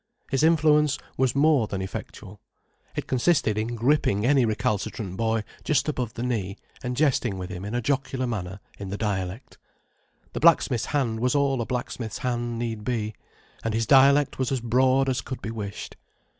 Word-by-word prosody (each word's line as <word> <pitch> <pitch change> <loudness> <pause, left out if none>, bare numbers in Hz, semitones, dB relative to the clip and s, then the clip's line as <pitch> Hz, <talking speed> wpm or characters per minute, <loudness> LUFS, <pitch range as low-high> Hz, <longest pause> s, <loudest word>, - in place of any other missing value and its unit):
His 135 - +1
influence 150 -3 +4 0.2
was 130 -1 +1
more 140 -5 +4
than 100 - -4
effectual. 95 +1 -7 0.5
It - - -3
consisted 130 -4 +2
in 110 +3 -2
gripping 115 -4 +2
any 135 -1 +4
recalcitrant 105 -3 -2
boy 110 +1 0 0.2
just 150 - +1
above 125 -6 -2
the 120 - -4
knee, 105 -6 -2 0.2
and 125 -1 -4
jesting 125 -8 +1
with 90 0 -6
him 90 -1 -6
in 105 +4 -4
a 120 - 0
jocular 135 0 -1
manner, 100 -5 -4 0.2
in 100 -1 -6
the 100 - -4
dialect. 105 +3 -4 0.7
The 120 - -3
blacksmith's 145 -6 +4
hand 125 -6 -1
was 125 +4 +1
all 140 -3 +2
a 115 - -4
blacksmith's 120 -3 -4
hand 120 -2 -2
need 115 -2 -3
be, 110 -2 -2 0.5
and 115 -1 -1
his 115 0 +1
dialect 140 +3 +5
was 130 0 0
as 135 - +1
broad 130 +3 +2
as 130 -1 0
could 130 - -6
be 110 - -5
wished. 105 -3 -6
120 Hz, 175 wpm, -25 LUFS, 110-135 Hz, 0.7 s, dialect